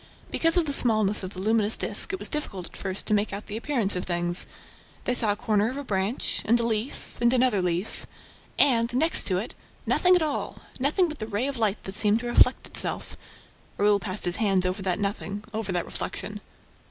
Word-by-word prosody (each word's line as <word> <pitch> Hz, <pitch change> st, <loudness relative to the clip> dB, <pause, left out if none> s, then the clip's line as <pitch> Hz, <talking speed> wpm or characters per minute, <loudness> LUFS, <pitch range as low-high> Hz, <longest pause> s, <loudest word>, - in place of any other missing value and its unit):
Because 330 Hz, +1 st, +3 dB
of 345 Hz, -, +2 dB
the 285 Hz, -, -2 dB
smallness 215 Hz, -5 st, +4 dB
of 185 Hz, 0 st, -7 dB
the -, -, -7 dB
luminous 215 Hz, +1 st, +2 dB
disk, -, -, +2 dB
it 385 Hz, -, -3 dB
was -, -, +2 dB
difficult 210 Hz, -, -4 dB
at -, -, -13 dB
first 190 Hz, 0 st, -4 dB
to 215 Hz, -, 0 dB
make 210 Hz, 0 st, +1 dB
out 200 Hz, +1 st, -6 dB
the 210 Hz, -, -7 dB
appearance 230 Hz, -5 st, +2 dB
of 180 Hz, -, -3 dB
things: 175 Hz, 0 st, +1 dB, 0.6 s
they 245 Hz, -, +1 dB
saw 225 Hz, -4 st, +3 dB
a -, -, -1 dB
corner 210 Hz, 0 st, 0 dB
of 260 Hz, -, -6 dB
a 285 Hz, -, -5 dB
branch... 200 Hz, 0 st, -1 dB
and 235 Hz, +2 st, +3 dB
a -, -, 0 dB
leaf... 225 Hz, +3 st, -3 dB
and 235 Hz, 0 st, +4 dB
another 250 Hz, -6 st, +2 dB
leaf... 180 Hz, +3 st, -3 dB, 0.5 s
and, 240 Hz, -3 st, +3 dB
next 320 Hz, +6 st, +3 dB
to 185 Hz, -, 0 dB
it, 210 Hz, +6 st, -5 dB, 0.3 s
nothing 365 Hz, 0 st, +3 dB
at 350 Hz, -, +2 dB
all, 300 Hz, -2 st, -4 dB, 0.2 s
nothing 305 Hz, +8 st, +2 dB
but 305 Hz, -2 st, -8 dB
the 215 Hz, -, -5 dB
ray 225 Hz, +3 st, -2 dB
of 275 Hz, -3 st, -3 dB
light 210 Hz, -2 st, 0 dB
that 190 Hz, -, -6 dB
seemed 210 Hz, +2 st, +1 dB
to -, -, -7 dB
reflect 240 Hz, -, +3 dB
itself... -, -, -2 dB, 0.6 s
Raoul 205 Hz, 0 st, +3 dB
passed 185 Hz, +2 st, -1 dB
his 175 Hz, 0 st, 0 dB
hand 195 Hz, -4 st, +2 dB
over 185 Hz, +2 st, -2 dB
that 185 Hz, -2 st, -1 dB
nothing, 205 Hz, 0 st, -4 dB
over 215 Hz, -3 st, -3 dB
that 175 Hz, -1 st, -1 dB
reflection. -, -, -5 dB
215 Hz, 215 wpm, -25 LUFS, 195-245 Hz, 0.6 s, smallness